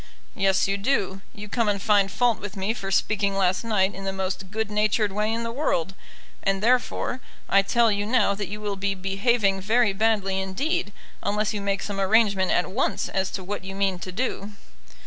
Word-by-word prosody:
"Yes, 195 -2 +2
you 195 0 0
do. 200 -4 0
You 210 -2 -9
come 225 +1 0
and 200 -1 0
find 200 -1 +3
fault 240 +1 +2
with 205 0 -7
me 195 +3 0
for 195 -4 -5
speaking 200 0 +1
last 185 +1 +1
night 205 -4 +1
in 195 - -8
the 195 - -1
most 190 0 -4
good 220 +1 -3
natured 210 0 +1
way 210 +2 0
in 230 +1 -2
the 230 - -3
world. 195 - -1 0.5
And, 195 0 0
therefore, 250 +1 +1 0.3
I 195 - +5
tell 230 +3 +3
you 205 0 -1
now 220 -4 +3
that 200 -1 -4
you 210 +1 -6
will 205 -2 -3
be 195 0 -1
behaving 195 +1 +1
very 220 +1 +2
badly 195 -2 +1
indeed, 265 - -2 0.3
unless 210 +1 0
you 205 - -3
make 200 0 -1
some 200 -1 -4
arrangement 200 -2 +3
at 180 - +1
once 245 +8 -1
as 190 0 -1
to 190 - -4
what 200 +1 -5
you 195 0 -7
mean 195 -2 0
to 185 - -6
do." 210 -1 -3
200 Hz, 205 wpm, -25 LUFS, 195-220 Hz, 0.5 s, I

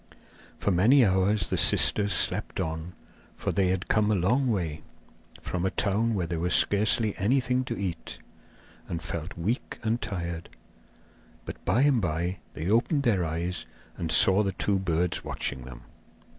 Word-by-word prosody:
For 100 - 0
many 115 +9 +5
hours 95 +1 +1
the - - 0
sisters 100 -1 +2
slept - - +1
on, 80 +2 -4 0.4
for - - -3
they 95 -2 +1
had 95 0 -1
come 105 -1 +2
a 110 - +2
long 120 +9 +1
way, 85 -8 -2 0.6
from 90 -1 -4
a 95 - +1
town 105 +5 0
where 90 -3 -1
there 85 0 -3
was 90 +2 +3
scarcely 105 +1 +3
anything 125 +4 +1
to 115 - -4
eat, 95 -4 -5 0.7
and 85 - -4
felt 80 +1 -6
weak 105 +9 -3
and 115 +2 -1
tired. 85 -4 -5 1.0
But - - -9
by 125 - +2
and 140 -5 +3
by 85 +2 -2 0.2
they 80 - -4
opened 120 - +2
their 100 -8 +2
eyes 85 +2 -3 0.3
and 80 -2 -4
saw 95 +5 +7
the 100 -2 -1
two 100 +2 0
birds 85 -2 -1
watching 65 -3 -4
them. - - -11
95 Hz, 160 wpm, -27 LUFS, 85-110 Hz, 1.0 s, saw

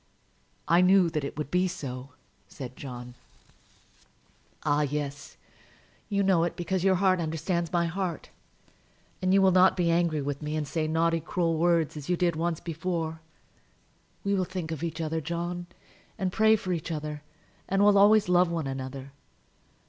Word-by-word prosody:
"I 170 +1 +5
knew 180 -2 +5
that 150 -2 -2
it 140 - -5
would 150 -2 -4
be 180 +1 +2
so," 135 -7 -6 0.4
said 130 -3 -8
John. 125 -2 -8 1.5
"Ah, 150 0 +2
yes; 145 0 -4 0.7
you 200 -1 +1
know 190 -4 +3
it, 170 - -2
because 180 +1 -2
your 190 -1 +4
heart 185 0 +3
understands 170 +1 -2
my 170 -1 +2
heart. 175 -1 -4 0.9
And 185 0 +1
you 195 0 +5
will 190 - +5
not 185 +1 +5
be 170 -2 +2
angry 165 -3 +1
with 145 +1 -3
me, 150 0 -3
and 150 -2 -2
say 155 +1 -1
naughty, 165 +1 +1
cruel 165 +1 -1
words, 165 -1 +2
as 150 0 -8
you 180 - +2
did 170 -2 +1
once 165 0 -1
before. 165 -1 -3 1.0
We 200 - 0
will 190 -2 +2
think 180 -3 -5
of 160 - -4
each 165 -1 -4
other, 160 0 -2
John, 175 +2 -4 0.5
and 190 -3 -1
pray 220 0 +5
for 185 -4 -3
each 170 0 -4
other; 150 -1 -4 0.5
and 195 +1 +2
will 205 0 +6
always 205 +1 +6
love 180 0 +4
one 165 -3 -2
another. 135 0 -6
170 Hz, 170 wpm, -28 LUFS, 150-180 Hz, 1.5 s, will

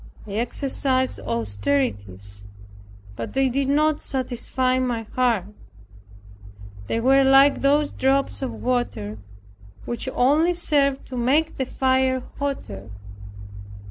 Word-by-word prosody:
I 210 - -9
exercised 260 +3 -1
austerities, 100 -3 -2 0.7
but 115 - -6
they 270 0 +2
did 270 +2 0
not 305 +1 +2
satisfy 255 0 -1
my 245 -3 -1
heart. 230 -4 0 1.4
They 225 - 0
were 270 +3 +4
like 270 +1 +5
those 290 +1 +3
drops 270 +1 +1
of 265 - -2
water 240 - -2 0.7
which 240 +2 -3
only 305 +8 +3
serve 280 -5 +1
to 255 - -8
make 285 +7 +1
the 265 - +1
fire 260 -1 +1 0.2
hotter. 110 - -4
260 Hz, 110 wpm, -23 LUFS, 210-275 Hz, 1.4 s, like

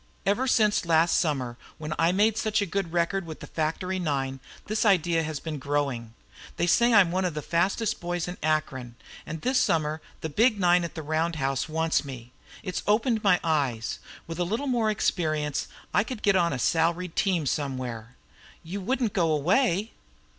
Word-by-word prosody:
Ever 220 +7 +1
since 215 -4 +3
last 165 0 +3
summer 130 -7 -1 0.2
when 155 0 -4
I 165 +1 +4
made 210 +3 +3
such 220 -1 0
a 205 - +1
good 195 -1 -2
record 175 +2 0
with 160 - -7
the - - -8
factory 175 +4 -2
nine 135 -5 -2 0.3
this 215 +1 0
idea 175 -5 +3
has 155 -2 -4
been 155 -2 -5
growing. 135 -5 -2 0.4
They 170 - +1
say 235 +7 +4
I'm 200 -6 +6
one 185 +1 0
of 175 -4 -1
the 150 - -4
fastest 190 +6 0
boys 175 -1 -3
in 180 - -5
Akron, 135 -6 -1 0.3
and 160 0 -5
this 255 0 +2
summer 155 -8 +1 0.2
the - - -2
big 220 - +3
nine 175 -1 +4
at 170 - -5
the 160 - -5
round 160 +2 0
house 135 0 -1
wants 160 +1 +1
me. 125 -4 -9 0.3
It's 185 -3 -3
opened 220 +1 +2
my 185 -3 +4
eyes. 140 -9 0 0.3
With 165 +1 -7
a - - +2
little 225 +10 -2
more 240 -5 +1
experience 155 -8 0 0.3
I 205 - +4
could 235 -1 -7
get 200 -1 +4
on 170 -2 +3
a 135 - -2
salaried 165 +6 +1
team 180 -6 +1
some 140 -1 -1
where." 120 -1 -6 0.5
"You 185 +5 -5
wouldn't 240 +1 0
go 170 -3 +2
away?" 190 - +2
170 Hz, 190 wpm, -27 LUFS, 150-200 Hz, 0.5 s, I'm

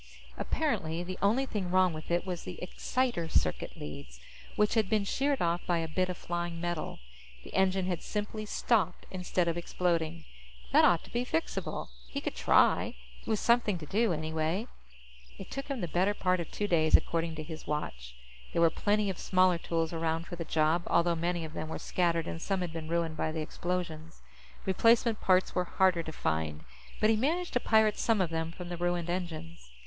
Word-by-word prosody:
Apparently, 170 - -1
the 185 +1 -6
only 230 +7 +3
thing 200 -8 -3
wrong 185 -1 +4
with 155 0 -8
it 175 +1 +1
was 180 -3 -3
the 180 - -8
exciter 180 -1 -1
circuit 80 - 0
leads, 70 -4 -8 0.4
which 210 0 +3
had 220 -4 +2
been 215 -2 +2
sheared 275 +5 0
off 170 +1 +1
by 175 - +2
a 165 -1 -1
bit 185 +3 0
of 180 - -3
flying 175 -1 -3
metal. 175 -2 -3 0.5
The - - -12
engine 190 0 +2
had 180 -2 -2
simply 215 0 -4
stopped 200 -6 +1
instead 180 -1 0
of 170 0 0
exploding. 170 -2 -1 0.5
That - - +6
ought 170 -2 +4
to - - -15
be 240 +1 +1
fixable. 165 - -2 0.2
He - - -3
could - - -3
try; - - +3 0.3
it - - -19
was 220 -2 +1
something 235 -5 +3
to 160 - -8
do, 220 +6 +2
anyway. 160 +5 -1 0.7
It - - -10
took 275 0 -4
him 275 -5 -3
the 175 - -1
better 185 +5 +1
part 185 -2 +1
of 170 - -4
two 205 - -2
days, 160 -4 +5
according 165 -1 -2
to 155 - -5
his 160 0 -8
watch. 60 - -4 0.4
There 170 - +2
were 165 - +5
plenty 210 +3 +1
of 185 - -8
smaller 185 -2 +3
tools 165 -1 -1
around 165 0 -1
for 175 - -7
the 170 - -4
job, 160 +1 +2
although 170 0 +3
many 170 0 -1
of 155 - -9
them 155 -1 -4
were - - -3
scattered 170 -2 0
and 165 - -5
some 195 0 -1
had 175 -2 -3
been 160 -1 -5
ruined 165 -1 -1
by 155 - 0
the 160 0 -3
explosions. 165 -1 -4 0.4
Replacement 230 +3 +3
parts 185 0 +3
were 180 - +1
harder 185 -1 +3
to 160 - -6
find, 80 - -2 0.4
but 215 - +4
he - - +4
managed 325 +10 0
to 250 - +3
pirate 220 -2 +3
some 225 -3 +2
of 180 -3 +1
them 165 0 -2
from 175 +1 -8
the 175 - -4
ruined 175 0 0
engines. 170 - -5
175 Hz, 200 wpm, -30 LUFS, 165-195 Hz, 0.7 s, That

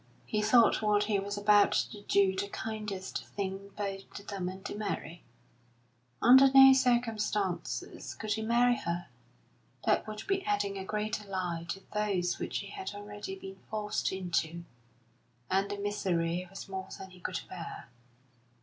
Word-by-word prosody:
He 215 - 0
thought 225 +2 +5
what 210 -1 +3
he 210 -1 +1
was 200 +1 -4
about 205 0 +5
to 205 - -1
do 200 -2 +3
the 195 +1 -1
kindest 210 -3 -4
thing 195 0 -3
both 195 -1 -4
to 200 - -7
them 190 -3 -3
and 190 +1 -9
to - - -4
Mary. 195 -5 -4 1.0
Under 265 +3 +8
no 270 0 +10
circumstances 225 -7 0
could 215 -1 -2
he 220 - -2
marry 240 +2 +3
her; 170 +1 -3 0.8
that - - +2
would 215 0 -6
be 390 -1 0
adding 205 -1 0
a - - -4
greater 210 +1 -3
lie 175 -3 -3
to 195 - -3
those 200 -4 0
which - - -2
he - - -8
had 390 - -6
already 205 -1 -6
been 190 0 -10
forced 210 -1 -1
into, 170 -2 -1 0.9
and 195 +1 +2
the 205 - -3
misery 180 -4 -1
was 195 +1 -8
more 190 -1 -5
than 190 0 -9
he 180 - -15
could - - -3
bear. - - -7
205 Hz, 160 wpm, -31 LUFS, 190-215 Hz, 1.0 s, no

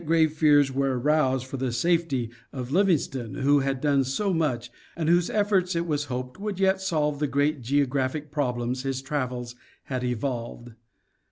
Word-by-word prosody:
grave 160 -1 +3
fears 145 -3 +4
were 135 -1 0
aroused 130 -1 +2
for 135 +1 -6
the 130 -1 -1
safety 135 -3 0 0.2
of 130 -1 -6
Livingstone, 145 - +1
who 145 +2 +3
had 135 -1 -1
done 140 -1 +2
so 185 +10 -1
much, 125 -8 -1 0.2
and 160 -2 -2
whose 175 +1 +3
efforts 200 -4 +1
it 170 0 0
was 150 -3 -1
hoped 125 +1 -5
would 205 -2 -4
yet 190 0 +2
solve 150 -5 0
the 150 - +1
great 145 +1 0
geographic 140 +2 0
problems 125 -3 -1
his 135 -1 -2
travels 125 -4 -3 0.3
had 130 -2 -4
evolved. 120 -1 -3
140 Hz, 165 wpm, -26 LUFS, 130-160 Hz, 0.3 s, fears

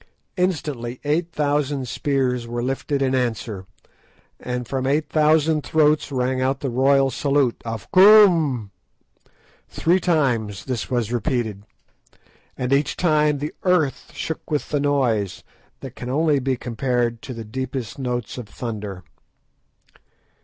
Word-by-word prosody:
Instantly 145 - -2
eight 160 +4 0
thousand 145 -3 -1
spears 125 -2 -1
were 120 0 -3
lifted 135 +2 -1
in 130 -1 +1
answer, 115 -6 -2 0.7
and 125 -1 -4
from 130 -1 -2
eight 150 +2 +1
thousand 155 0 +3
throats 150 -1 +2
rang 130 0 0
out 130 +1 0
the 135 - -2
royal 135 +2 +3
salute 140 -1 +1
of 115 -3 -5
"Koom." 175 - +6 1.0
Three 175 +3 +2
times 125 - 0
this 125 -4 -3
was 120 -3 -1
repeated, 110 -3 -2 0.9
and 125 +1 -1
each 140 0 +1
time 150 -3 +2
the 150 +2 -4
earth 180 -7 +1
shook 160 - -5
with 150 -2 -2
the 145 - 0
noise, 125 -9 0 0.4
that 130 -2 -8
can 125 - -6
only 150 +1 +2
be 130 -1 -1
compared 120 -1 -1
to 130 - -7
the 115 -1 -7
deepest 130 +1 -5
notes 125 -2 -3
of 110 -4 -9
thunder. 105 -5 -6
130 Hz, 130 wpm, -22 LUFS, 120-150 Hz, 1.0 s, Koom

